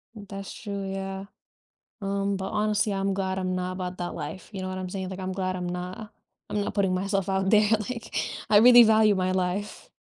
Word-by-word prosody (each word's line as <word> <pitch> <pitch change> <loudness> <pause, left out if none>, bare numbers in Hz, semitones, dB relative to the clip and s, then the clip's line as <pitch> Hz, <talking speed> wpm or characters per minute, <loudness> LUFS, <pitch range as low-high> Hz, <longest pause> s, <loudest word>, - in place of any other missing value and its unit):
That's 195 -1 -8
true, 200 -2 -5
yeah. 195 0 -4 0.8
Um, 200 0 0
but 190 0 -4
honestly, 210 0 +1
I'm 195 0 0
glad 190 -1 -1
I'm 185 -1 -1
not 180 0 -2
about 185 0 -4
that 175 0 -4
life, 185 - -6
you 190 - -5
know 185 - -3
what 185 0 -4
I'm 185 -1 -5
saying? 190 -1 -4
Like, 190 0 -6
I'm 185 0 -3
glad 185 -1 -2
I'm 180 -1 -3
not 180 +4 -6 0.4
I'm 210 - 0
not - - -3
putting 195 -3 +2
myself 195 +1 -1
out 190 0 +1
there, 210 0 +5 0.2
like, 235 -2 -6 0.4
I 205 - +8
really 240 +2 +9
value 220 -1 +5
my 185 -1 0
life. 185 +2 -2
195 Hz, 210 wpm, -26 LUFS, 185-205 Hz, 0.8 s, really